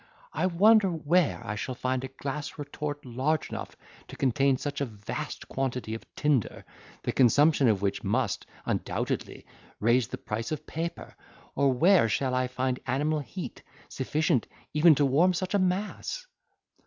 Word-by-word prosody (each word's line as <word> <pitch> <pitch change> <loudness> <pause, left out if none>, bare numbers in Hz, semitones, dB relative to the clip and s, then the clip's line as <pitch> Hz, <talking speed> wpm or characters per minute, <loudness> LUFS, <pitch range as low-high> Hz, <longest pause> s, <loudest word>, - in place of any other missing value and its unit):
I - - +1
wonder 200 +3 +5
where 165 0 +1
I 105 - -3
shall 115 +5 -4
find 130 +1 -1
a - - -3
glass 140 +3 -5
retort 145 0 -5
large 130 +6 -1
enough - - -6 0.3
to - - -10
contain 135 +1 +2
such 145 +1 -4
a - - +2
vast 105 -4 -6
quantity 125 -4 -2
of 115 - -7
tinder, 145 -7 0 0.4
the - - 0
consumption 140 +3 +4
of 100 -3 +2
which 100 0 -1
must, - - -1 0.2
undoubtedly, - - -2 0.3
raise 120 +2 +3
the - - -6
price 115 +7 -4
of 155 0 -4
paper, 165 +2 -5 0.4
or 140 -1 +3
where 160 - +5
shall 130 +4 0
I 130 0 +1
find 125 0 -1
animal 150 +4 +1
heat 115 -11 -7 0.3
sufficient 150 0 0 0.3
even 155 +1 +6
to 145 - +3
warm 165 +7 +4
such 185 +3 -2
a 200 - +3
mass?" 200 - -2
140 Hz, 155 wpm, -28 LUFS, 125-160 Hz, 0.4 s, even